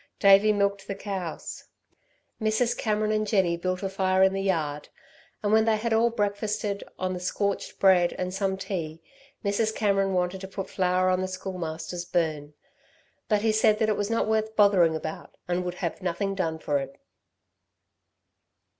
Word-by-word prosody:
Davey 200 Hz, +2 st, +6 dB
milked 200 Hz, -1 st, 0 dB
the 200 Hz, -, -3 dB
cows. 195 Hz, -4 st, -5 dB, 0.8 s
Mrs. 220 Hz, +2 st, +1 dB
Cameron 215 Hz, -2 st, 0 dB
and 215 Hz, 0 st, 0 dB
Jenny 190 Hz, -5 st, +2 dB
built 185 Hz, +2 st, -3 dB
a -, -, 0 dB
fire 190 Hz, -1 st, +2 dB
in 190 Hz, 0 st, +4 dB
the 195 Hz, -, -1 dB
yard, 155 Hz, -6 st, -1 dB, 0.5 s
and 205 Hz, 0 st, +1 dB
when 220 Hz, 0 st, +5 dB
they 220 Hz, -1 st, +3 dB
had 230 Hz, +1 st, -1 dB
all 230 Hz, +1 st, +4 dB
breakfasted 205 Hz, -2 st, -2 dB
on 185 Hz, 0 st, -2 dB
the 180 Hz, -, -4 dB
scorched 200 Hz, +2 st, -2 dB
bread 185 Hz, -3 st, +4 dB
and 180 Hz, 0 st, -4 dB
some 195 Hz, -1 st, -1 dB
tea, 165 Hz, -5 st, -5 dB, 0.4 s
Mrs. 215 Hz, +2 st, 0 dB
Cameron 195 Hz, -2 st, +1 dB
wanted 180 Hz, +1 st, -1 dB
to 190 Hz, -, -6 dB
put 195 Hz, 0 st, -6 dB
flour 185 Hz, 0 st, +2 dB
on 185 Hz, 0 st, +1 dB
the 185 Hz, -, -1 dB
Schoolmaster's 175 Hz, -2 st, -5 dB
burn. 155 Hz, -4 st, -2 dB, 0.7 s
But 210 Hz, -1 st, +2 dB
he 225 Hz, -, +3 dB
said 215 Hz, 0 st, +3 dB
that 220 Hz, -1 st, +1 dB
it 215 Hz, -, +2 dB
was 205 Hz, +1 st, -2 dB
not 230 Hz, -1 st, +1 dB
worth 220 Hz, 0 st, 0 dB
bothering 190 Hz, -6 st, +5 dB
about 155 Hz, 0 st, -6 dB
and 180 Hz, +1 st, 0 dB
would 180 Hz, 0 st, -4 dB
have 175 Hz, +1 st, -4 dB
nothing 185 Hz, +2 st, -1 dB
done 165 Hz, -5 st, -2 dB
for 145 Hz, -2 st, 0 dB
it. 135 Hz, 0 st, -8 dB
195 Hz, 170 wpm, -26 LUFS, 180-210 Hz, 0.8 s, Davey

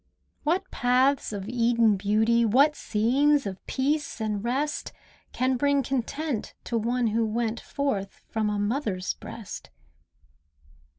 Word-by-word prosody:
What 355 Hz, +6 st, 0 dB
paths 255 Hz, +2 st, +2 dB
of 200 Hz, -2 st, -5 dB
Eden 235 Hz, -2 st, +3 dB
beauty, 220 Hz, +4 st, +2 dB
What 275 Hz, +7 st, +4 dB
scenes 275 Hz, +7 st, +2 dB
of 190 Hz, -2 st, -6 dB
peace 290 Hz, 0 st, -1 dB
and 210 Hz, -2 st, -2 dB
rest, 275 Hz, +5 st, -1 dB, 0.4 s
Can 255 Hz, 0 st, +1 dB
bring 285 Hz, +1 st, +2 dB
content 270 Hz, +1 st, -3 dB
to 235 Hz, -, -3 dB
one 235 Hz, +2 st, +1 dB
who 225 Hz, +1 st, +1 dB
went 225 Hz, +1 st, -1 dB
Forth 210 Hz, -9 st, -3 dB
from 220 Hz, -1 st, 0 dB
a 210 Hz, -, -1 dB
mother's 205 Hz, -3 st, -1 dB
breast? 220 Hz, -4 st, -9 dB
235 Hz, 125 wpm, -26 LUFS, 215-275 Hz, 0.4 s, What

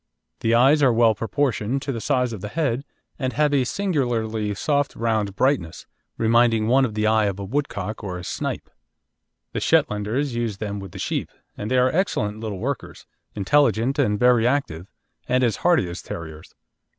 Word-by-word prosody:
The 115 Hz, +1 st, +2 dB
eyes 135 Hz, +5 st, +5 dB
are 135 Hz, -3 st, +5 dB
well 115 Hz, -1 st, +4 dB
proportioned 125 Hz, +2 st, -1 dB
to 140 Hz, -, -2 dB
the 115 Hz, -4 st, -4 dB
size 125 Hz, -3 st, 0 dB
of 105 Hz, -, -7 dB
the 105 Hz, -, -4 dB
head, 135 Hz, 0 st, -1 dB, 0.4 s
and 130 Hz, -2 st, -2 dB
have 150 Hz, +3 st, +2 dB
a 135 Hz, -2 st, +3 dB
singularly 120 Hz, -, -1 dB
soft 145 Hz, +6 st, 0 dB
round 110 Hz, -4 st, -1 dB
brightness, 130 Hz, -, 0 dB, 0.3 s
reminding 115 Hz, -1 st, +3 dB
one 130 Hz, +4 st, +4 dB
of 110 Hz, -4 st, -5 dB
the 105 Hz, 0 st, 0 dB
eye 110 Hz, 0 st, +3 dB
of 100 Hz, -2 st, -1 dB
a -, -, -4 dB
woodcock 110 Hz, -4 st, -3 dB
or 90 Hz, -3 st, -4 dB
a 90 Hz, -, -8 dB
snipe. -, -, -4 dB, 0.8 s
The -, -, -1 dB
Shetlanders 110 Hz, +7 st, +1 dB
use 115 Hz, -4 st, -2 dB
them 100 Hz, -1 st, -4 dB
with 95 Hz, -3 st, -9 dB
the -, -, -8 dB
sheep, -, -, -2 dB, 0.3 s
and 105 Hz, -, -5 dB
they 130 Hz, -, +2 dB
are 125 Hz, +1 st, +3 dB
excellent 110 Hz, -, 0 dB
little 110 Hz, -3 st, -4 dB
workers, 135 Hz, +8 st, -5 dB, 0.3 s
intelligent 120 Hz, +4 st, +2 dB
and 105 Hz, -7 st, +2 dB
very 120 Hz, 0 st, +4 dB
active, 100 Hz, -, -1 dB, 0.4 s
and 130 Hz, +1 st, +2 dB
as 115 Hz, -5 st, +1 dB
hardy 170 Hz, -, +2 dB
as 85 Hz, 0 st, -6 dB
terriers. 80 Hz, -2 st, -9 dB
115 Hz, 180 wpm, -23 LUFS, 105-135 Hz, 0.8 s, eyes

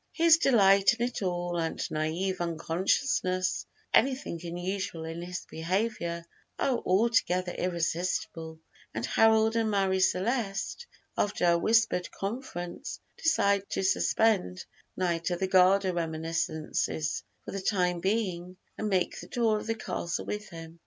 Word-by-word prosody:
His 330 Hz, -1 st, +6 dB
delight 200 Hz, -, +5 dB
in 235 Hz, +1 st, 0 dB
it 245 Hz, -2 st, -4 dB
all, 175 Hz, -2 st, -1 dB
and 165 Hz, -1 st, -2 dB
naïve 170 Hz, +5 st, -2 dB
unconsciousness 185 Hz, -, 0 dB
of -, -, -42 dB, 0.2 s
anything 260 Hz, -8 st, -3 dB
unusual 175 Hz, -1 st, -4 dB
in 165 Hz, +1 st, -5 dB
his 180 Hz, +1 st, -6 dB
behavior, 170 Hz, 0 st, -2 dB, 0.3 s
are 260 Hz, -3 st, +1 dB
altogether 185 Hz, -3 st, +2 dB
irresistible, 170 Hz, -2 st, -2 dB, 0.4 s
and 110 Hz, +1 st, -1 dB
Harold 220 Hz, -, +4 dB
and 225 Hz, -1 st, +1 dB
Marie 195 Hz, -2 st, +1 dB
Celeste, 195 Hz, -, 0 dB, 0.3 s
after 205 Hz, -3 st, 0 dB
a 170 Hz, 0 st, +5 dB
whispered 220 Hz, -3 st, +2 dB
conference, 195 Hz, -5 st, -5 dB, 0.2 s
decide 200 Hz, -12 st, +2 dB
to -, -, -2 dB
suspend 190 Hz, -, +1 dB, 0.3 s
Knight 170 Hz, -2 st, 0 dB
of 175 Hz, -1 st, -2 dB
the 190 Hz, -, +1 dB
Garter 190 Hz, 0 st, +4 dB
reminiscences 160 Hz, -, -2 dB, 0.2 s
for -, -, -6 dB
the 195 Hz, -, -4 dB
time 180 Hz, -3 st, +1 dB
being, 185 Hz, -2 st, -2 dB, 0.2 s
and 215 Hz, -, -1 dB
make 185 Hz, -3 st, 0 dB
the -, -, -9 dB
tour 225 Hz, -3 st, +1 dB
of -, -, -8 dB
the 225 Hz, -, 0 dB
castle 175 Hz, -5 st, -3 dB
with 210 Hz, 0 st, -5 dB
him. 165 Hz, -1 st, -10 dB
185 Hz, 135 wpm, -29 LUFS, 170-215 Hz, 0.4 s, His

